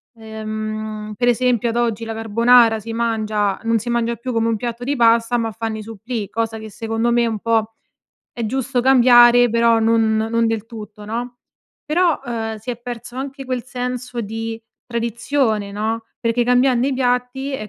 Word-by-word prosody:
ehm, 215 -1 -5
per 245 - +1
esempio 245 -1 +2
ad 230 - -2
oggi 230 -2 0
la 225 - -4
carbonara 225 +1 +4
si 225 +2 -7
mangia 215 -3 -1
non 230 0 +1
si 235 +3 -6
mangia 235 0 0
più 250 +2 -5
come 225 -1 +1
un 230 - +1
piatto 235 +2 -5
di 285 +2 0
pasta 230 -1 +3
ma 225 -1 -1
fanno 225 0 -4
i 215 - -7
supplì, 225 0 -5
cosa 225 0 -2
che 220 0 -8
secondo 225 +2 -1
me 240 0 +3
è - - +2
un 225 -2 -2
po' 225 0 0 0.6
è 235 -2 -3
giusto 260 +2 -1
cambiare, 245 -1 +6
però 230 0 +3
non 225 -1 +2
non 225 +1 +1
del 225 -2 -1
tutto, 215 -2 -10
no, 240 +3 -5 0.5
però, 335 +1 +2
uhm, 225 -3 -3
si 220 +4 -6
è 240 - -5
perso 240 0 -8
anche 270 +1 -5
quel 255 -2 -3
senso 250 -1 -4
di 225 +1 -5 0.3
tradizione, 235 -2 -1
no, 220 +3 -3
perché 230 +1 +1
cambiando 250 +1 +3
i 275 - 0
piatti 250 +2 -1
è 215 -6 -5
230 Hz, 185 wpm, -20 LUFS, 220-245 Hz, 0.6 s, cambiare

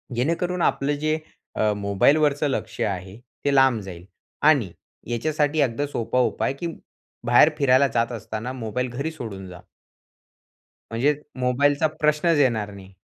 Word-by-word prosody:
जेणेकरून 170 +7 -1
आपलं 145 -1 +1
जे 155 0 +2 0.6
मोबाईलवरचं 140 +9 +2
लक्ष - - -4
आहे 95 0 -3 0.3
ते 140 - +2
लांब 135 -4 +4
जाईल 90 -2 -10 0.4
आणि 120 - +2 0.4
याच्यासाठी 150 +4 0
अगदी 140 +2 0
सोपा 125 -1 -1
उपाय 115 +1 0
की 170 - -2 0.6
बाहेर 120 +6 +6
फिरायला 135 0 +4
जात 115 +1 +1
असताना 115 +1 -5
मोबाईल 125 +1 -3
घरी 140 +6 -3
सोडून 100 -10 -8
जा. 90 - -11 1.3
म्हणजे 130 +6 +2 0.3
मोबाईलचा 140 +5 +2
प्रश्नच 150 +2 +2
येणार 110 -7 +1
नाही. 95 -1 -13
125 Hz, 130 wpm, -23 LUFS, 110-145 Hz, 1.3 s, बाहेर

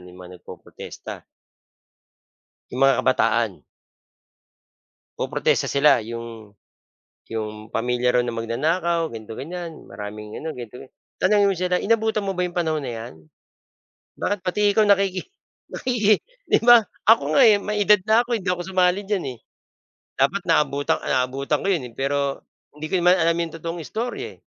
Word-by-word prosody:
'yong 90 0 -14
mga 90 -1 -12
nagpo-protesta - - -10 1.5
'yong 125 - -6
mga 135 -2 +5
kabataan. 115 -5 +1 1.6
Poprotesta - - 0
sila 140 -2 +4
'yong 115 -2 -9 0.7
'yong 110 -1 -5
pamilya 125 +1 0
raw - - +3
na 120 -1 -4
magnanakaw, 160 +9 -1
ganito, 110 0 -8
ganiyan, 170 +1 -7
maraming 105 +1 -8
ano, 160 - -5
ganito-gan 125 +1 -10 0.3
tanungin 200 +1 +4
mo - - 0
sila, 180 0 0
"Inabutan 220 0 +1
mo 195 - -1
ba 180 - 0
'yong 175 - -5
panahon 160 -3 -1
na 125 - -4
'yan? 115 -6 -7 1.0
Bakit 205 - -1
pati 180 +3 -1 0.2
ikaw 215 - +5
nakiki 195 -2 +2 0.5
nakiki" 215 -4 +2 0.3
'Di - - +4
ba? 240 -2 +8 0.3
Ako 155 -9 +4
nga, - - +7
eh, 210 - +6
may 210 0 -2
edad 210 0 +6
na 220 +2 +5
ako, 240 -1 -1
hindi 190 -1 -6
ako 175 -1 -3
sumali 185 0 +2
diyan, 205 -4 -1
eh. - - -26 0.8
Dapat 175 +9 +1
naabutan 145 -4 +1
naabutan 135 +3 0
ko - - -2
'yon, 165 -9 0
eh, - - -19
pero, 140 0 -1 0.3
hindi 155 - -6
ko - - +1
naman 180 +1 +5
alam 170 -1 +2
'yong 170 -2 -3
totoong 165 +1 -5
istorya, 235 +7 -4
eh, - - -28
155 Hz, 155 wpm, -23 LUFS, 120-190 Hz, 1.6 s, ba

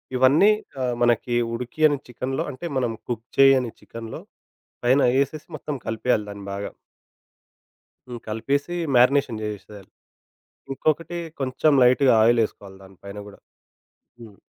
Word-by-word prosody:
ఇవన్నీ 140 +11 +5 0.3
ఆహ్, 125 -1 -1
మనకి 120 0 +1 0.2
ఉడికియని 145 +5 +1
చికెన్‌లో, 125 +2 -3
అంటే 130 +6 -9
మనం 125 -3 0 0.2
కుక్ 115 -1 -4
చేయని 135 -4 +5
చికెన్‌లో 115 -1 -9 0.6
పైన 130 +3 +4 0.2
ఏసేసి 150 +2 -4
మొత్తం 150 0 -5
కలిపేయాలి 110 -1 0
దాన్ని 100 -1 -9
బాగా. 100 +1 -5 1.4
హ్మ్. 120 -2 -7
కలిపేసి 140 +9 -2 0.2
మారినేషన్ 125 -2 +3
జేసెశారు. 105 -2 -8 0.8
ఇంకొకటి 155 +5 -1 0.2
కొంచెం 135 +4 +1
లైట్‌గా 125 0 +5
ఆయిలేసుకోవాలి 110 -4 0
దాని 95 -1 -16
పైన 100 +1 -8
గూడా. 100 - -14 0.8
హ్మ్. 105 -4 -13
125 Hz, 115 wpm, -23 LUFS, 110-135 Hz, 1.4 s, ఇవన్నీ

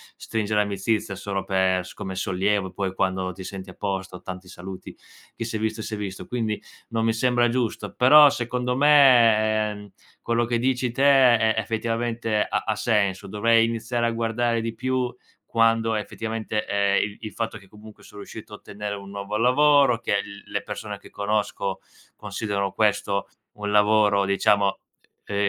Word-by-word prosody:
stringere 105 -1 -1
amicizia 105 +1 -1
solo 95 0 -4
per 95 -1 +1
s 90 - -12
come 95 - -6
sollievo, 95 +1 0
poi 95 -2 -3
quando 95 -1 -1
ti 95 +1 -9
senti 95 0 -8
a - - -14
posto: 95 -2 -4
"Tanti 90 0 -8
saluti, 95 0 -9 0.4
chi 115 - -4
si 115 - -5
è - - -1
visto, 110 0 -2
si 110 - -5
è - - -7
visto". 100 -2 -6
Quindi 110 -4 -2 0.3
non 115 0 -1
mi 115 - +2
sembra 120 +1 +2
giusto. 115 -4 -2
Però, 145 +4 +8
secondo 125 -1 -2
me, 115 -7 +5
ehm, 105 -1 -10 0.3
quello 115 0 0
che 120 0 -1
dici 125 0 0
te 135 +3 -1 0.4
è 110 0 +2
effettivamente 115 0 -1
ha - - -1
ha 110 - +1
senso, 100 -4 0
dovrei 115 +3 +3
iniziare 115 +1 -2
a 115 - +1
guardare 115 0 0
di 115 0 -4
più 130 0 -1 0.3
quando 115 -1 +2
effettivamente, 110 0 -3
ehm 100 -1 +2
il 100 0 -6
il 110 -2 -6
fatto 115 -1 -3
che, 100 -2 -17
comunque, 105 +1 -15
son - - -15
riuscito 105 +1 -10
a - - -7
ottenere 105 0 -6
un 100 -1 -10
nuovo 100 +1 -4
lavoro, 135 0 +4
che - - -3
il 100 0 -11
le - - -1
persone - - -6
che - - -15
conosco 100 -2 -2 0.4
considerano 100 -2 -3
questo 100 -2 0 0.3
un 105 0 -4
lavoro, 105 -1 +4
diciamo, 100 0 +2 0.5
ehm, 100 - -5
110 Hz, 170 wpm, -24 LUFS, 100-115 Hz, 0.5 s, Però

